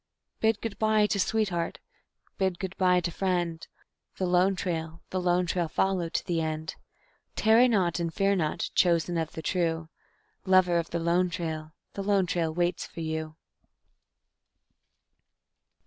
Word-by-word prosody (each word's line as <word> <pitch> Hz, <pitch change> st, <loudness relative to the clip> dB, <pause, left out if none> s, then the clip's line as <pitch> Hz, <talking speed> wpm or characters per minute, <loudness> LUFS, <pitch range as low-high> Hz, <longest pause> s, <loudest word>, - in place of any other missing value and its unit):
_Bid 220 Hz, -1 st, +2 dB
good 225 Hz, -3 st, -5 dB
by 215 Hz, -1 st, +3 dB
to 210 Hz, -1 st, 0 dB
sweetheart, 190 Hz, -5 st, 0 dB, 0.6 s
bid 190 Hz, -2 st, +1 dB
good 190 Hz, +1 st, -5 dB
by 180 Hz, -1 st, +3 dB
to 170 Hz, -, -2 dB
friend; 175 Hz, -3 st, -1 dB, 0.5 s
The 190 Hz, -, 0 dB
Lone 180 Hz, +2 st, +3 dB
Trail, 165 Hz, -3 st, -4 dB
the 185 Hz, -, -1 dB
Lone 180 Hz, 0 st, +2 dB
Trail 175 Hz, -1 st, -1 dB
follow 180 Hz, +1 st, 0 dB
to -, -, -2 dB
the 170 Hz, -2 st, 0 dB
end. 155 Hz, 0 st, -3 dB, 0.6 s
Tarry 225 Hz, +3 st, +5 dB
not, 185 Hz, -8 st, +1 dB
and 170 Hz, -1 st, -1 dB
fear 195 Hz, +4 st, +2 dB
not, 155 Hz, -5 st, -1 dB
chosen 175 Hz, -1 st, +2 dB
of 160 Hz, -1 st, -2 dB
the 160 Hz, -, -7 dB
true; 165 Hz, -2 st, -1 dB, 0.5 s
Lover 185 Hz, -2 st, +4 dB
of 165 Hz, -, -4 dB
the 170 Hz, -, -2 dB
Lone 170 Hz, +2 st, +2 dB
Trail, 160 Hz, -4 st, -4 dB, 0.2 s
the 200 Hz, -, -4 dB
Lone 195 Hz, -1 st, +2 dB
Trail 170 Hz, -2 st, -1 dB
waits 175 Hz, +2 st, 0 dB
for 165 Hz, -, -8 dB
you. 160 Hz, -1 st, -4 dB
175 Hz, 150 wpm, -28 LUFS, 165-190 Hz, 0.6 s, Tarry